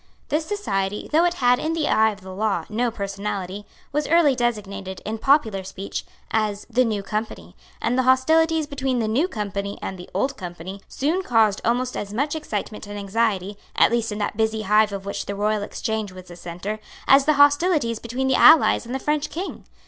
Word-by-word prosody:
This 315 +1 0
society, 205 - -2
though 325 +3 +4
it 350 0 +1
had, 250 -4 +3
in 320 +1 -1
the 315 -2 0
eye 220 0 +4
of 205 -2 -8
the 190 0 -9
law, 195 -4 -1
no 235 +3 0
personality, 200 -2 -4 0.2
was 295 +1 -1
early 320 -4 +4
designated, 200 -6 -3
in 220 +1 -3
popular 220 -8 +2
speech, 190 +1 -6 0.3
as 210 -2 0
the 250 +3 +4
New 215 -4 -1
Company; 195 - -5 0.2
and 235 - 0
the 260 - +3
hostilities 320 +4 +3
between 270 -3 -2
the 225 -2 0
New 260 +11 +2
Company 200 - -4
and 190 - -6
the 180 - -10
Old 275 0 -1
Company 180 +2 -7
soon 315 +7 -1
caused 225 - +2
almost 250 +2 0
as 205 0 -5
much 290 +5 0
excitement 215 -8 -5
and 205 0 -6
anxiety, 200 -1 -1 0.2
at - - +5
least 235 -1 0
in 210 - -4
that 210 0 -2
busy 220 -1 0
hive 210 +1 +4
of 195 -1 -6
which 200 - -4
the 200 - -3
Royal 210 +1 0
Exchange 215 0 -3
was 185 -1 -12
the 175 - -9
centre, 180 +5 -5 0.3
as 275 0 +6
the 305 - +4
hostilities 285 -4 +3
between 250 +3 -2
the 265 - +2
Allies 305 -3 +6
and 245 - -4
the - - +1
French 295 +2 -1
King. 365 +4 -6
220 Hz, 200 wpm, -23 LUFS, 200-270 Hz, 0.3 s, as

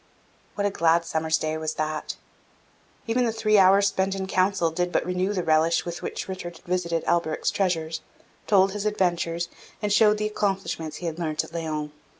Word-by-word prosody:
What 205 - -1
a 205 - +1
glad 170 -1 +3
summer's 160 -1 0
day 155 0 -2
was 155 0 -3
that! 155 0 -3 0.9
Even 235 +2 +1
the 235 - +1
three 215 -2 +3
hours 195 +1 +6
spent 190 0 -1
in 190 -1 -3
council 185 -3 +1
did 180 +2 -1
but - - +1
renew 180 +2 0
the 185 -4 -1
relish 160 +1 +3
with 175 0 -5
which - - -4
Richard 175 -3 -6
visited 170 -2 -1
Alberic's 165 -2 0
treasures, 165 -4 -1 0.5
told 195 -1 +4
his 210 +1 -2
adventures, 175 -4 0 0.3
and 210 -1 0
showed 210 0 +5
the 210 - -1
accomplishments 195 -7 -2
he 180 - -7
had 165 0 -3
learnt 155 -3 -1
at - - -13
Laon. 155 -3 -3
175 Hz, 180 wpm, -25 LUFS, 160-195 Hz, 0.9 s, hours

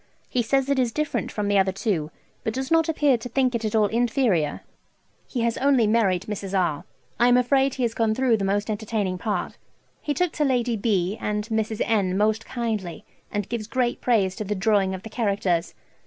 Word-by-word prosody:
He 250 - 0
says 270 +3 +1
it 280 -1 +1
is 245 -2 +1
different 305 +4 -2
from 210 -1 -2
the 200 -1 +3
other 190 0 +2
two, 185 -6 -1 0.3
but 220 - -2
does 265 +2 -3
not 325 -1 +3
appear 290 -6 +2
to 245 - -7
think 255 +1 +1
it 235 -1 -2
at 215 0 -1
all 215 -1 +4
inferior. 225 - +1 0.7
He 245 - -3
has 230 0 0
only 265 -3 +4
married 205 -5 +2
Mrs. 200 -2 -3
R. 155 -5 -1 0.3
I 240 - +5
am 245 0 +5
afraid 265 +2 +2
he 255 - -2
has 230 -1 0
gone 225 -2 +1
through 250 -2 +2
the 200 - -3
most 205 +2 0
entertaining 205 -3 -2
part. 210 -1 -3 0.4
He 290 - -2
took 360 +1 +1
to 305 - -1
Lady 245 -4 +1
B. 200 -2 0
and 210 0 -2
Mrs. 220 -1 -1
N. 195 -4 +1
most 215 +2 +1
kindly, 215 -8 -3 0.3
and 205 -2 -2
gives 230 -3 -4
great 245 0 -1
praise 200 -6 +2
to 215 - -3
the 210 0 -2
drawing 195 -1 +2
of 185 - -9
the 220 - -8
characters. 195 -7 0
220 Hz, 210 wpm, -24 LUFS, 200-245 Hz, 0.7 s, I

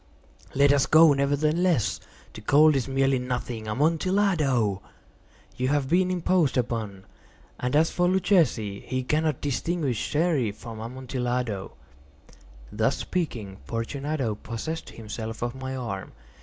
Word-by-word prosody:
"Let 140 +1 +5
us 140 -2 +2
go, 160 -1 +7
nevertheless. 150 - +1 0.3
The - - -9
cold 150 +7 +5
is 135 - 0
merely 135 -1 +2
nothing. 125 -3 -4
Amontillado! 150 - +1 0.7
You 130 - -1
have 140 -1 +1
been 180 +2 +3
imposed 180 -5 +1
upon. 110 -6 -2 0.5
And 125 +2 -1
as 160 +2 +4
for 175 0 +1
Luchesi, 170 - +2
he 130 0 -3
cannot 155 +1 0
distinguish 145 -3 -1
Sherry 150 -8 +1
from 115 +1 -9
Amontillado." 125 -3 -3 1.0
Thus - - +1
speaking, 115 - -3
Fortunato 135 +2 -2
possessed 115 +10 -5
himself 110 0 -6
of 120 0 -2
my 130 0 -5
arm. 110 -7 -5
130 Hz, 120 wpm, -26 LUFS, 115-155 Hz, 1.0 s, go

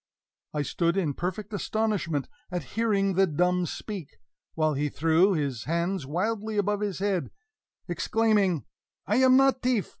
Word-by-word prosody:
I 150 - +1
stood 170 +4 0
in 160 -7 +1
perfect 190 +7 -4
astonishment 200 -8 -1 0.2
at 180 -1 -3
hearing 200 -4 +1
the 190 +1 +4
dumb 180 +2 +1
speak; 190 -7 -7 0.4
while 155 -1 +2
he 145 +1 -1
threw 165 +7 +3
his 140 -8 -2
arms 170 -1 -1
wildly 210 +7 -2
above 205 0 +1
his 205 -4 -2
head, 195 -3 -1 0.6
exclaiming: 190 - +1 0.4
"I - - +1
am 260 0 +6
not 270 -1 +4
teaf! 250 -5 +1
190 Hz, 145 wpm, -27 LUFS, 165-210 Hz, 0.6 s, am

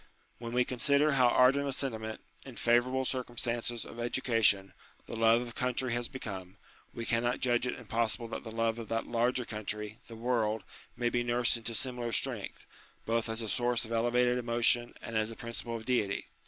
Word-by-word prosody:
When 115 0 -6
we 125 0 +3
consider 140 +4 +3
how 130 -3 +5
ardent 130 +3 +4
a - - -1
sentiment, 110 -5 -3 0.2
in 130 -3 -10
favourable 125 +3 +2
circumstances 120 -2 -1
of 120 - -10
education, 115 -5 +2 0.3
the - - -6
love 115 +1 +4
of 120 -1 -8
country 125 0 -1
has 120 0 -1
become, 95 -8 -7 0.3
we 115 - -5
cannot 120 +2 +1
judge 120 0 +2
it - - -3
impossible 115 0 -1
that - - -5
the 115 - -7
love 115 0 0
of 115 - -7
that 115 0 -1
larger 120 +1 +1
country, 105 0 -5
the 115 - -9
world, 110 -2 0 0.3
may 120 -1 +1
be 120 0 0
nursed 120 0 +2
into 115 0 -3
similar 125 -1 -1
strength, - - -2 0.4
both 115 0 0
as 115 +1 -3
a - - -4
source 120 +1 0
of 110 - -10
elevated 120 +2 +2
emotion 120 0 +2
and 115 - -6
as 110 0 +1
a 115 - -7
principle 115 0 -5
of 110 -1 -6
duty. 110 -6 0
120 Hz, 185 wpm, -31 LUFS, 115-125 Hz, 0.4 s, how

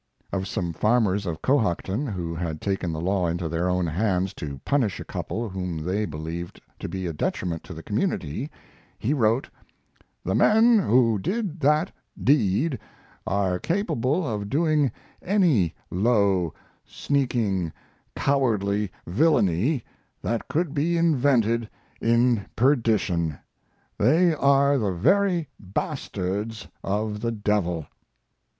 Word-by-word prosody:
Of 95 -1 -1
some 90 -4 -2
farmers 105 -1 +2
of 80 -2 -4
Cohocton, 115 - +1
who 90 -6 -3
had 80 -2 -3
taken 95 -2 -2
the 80 - -4
law 90 +1 +1
into 85 0 -2
their 85 +3 -1
own 90 0 +1
hands 95 +2 0
to 70 -4 -6
punish 125 -9 +1
a - - -7
couple 115 +1 -4
whom 90 -4 -4
they 95 +7 -1
believed 80 +2 -6 0.2
to - - -5
be 95 -1 -4
a 85 - -2
detriment 80 +2 -2
to - - -8
the - - -9
community, 115 - -2 0.5
he 130 - 0
wrote: 120 +1 +2 0.8
"The - - 0
men 225 +1 +5
who 115 - +3
did 190 - -2
that 150 +4 +2 0.3
deed 130 - +2 0.5
are 95 -2 0
capable 165 - 0
of 105 -3 -3
doing 150 -2 +2 0.3
any 165 - +2 0.2
low, 100 -4 +2 0.3
sneaking, 115 - -1 0.4
cowardly 105 -7 +1
villainy 115 - +2 0.4
that 115 0 -2
could 160 -1 -1
be 165 +3 +1
invented 125 -8 +2 0.3
in 115 -2 +2
perdition. 110 - +2 0.6
They 160 - +4
are 140 -1 +3
the 100 -5 0
very 175 - +2
bastards 100 +2 -3 0.2
of 105 +1 -1
the 115 0 0
devil." 100 -7 0
105 Hz, 125 wpm, -25 LUFS, 90-140 Hz, 0.8 s, men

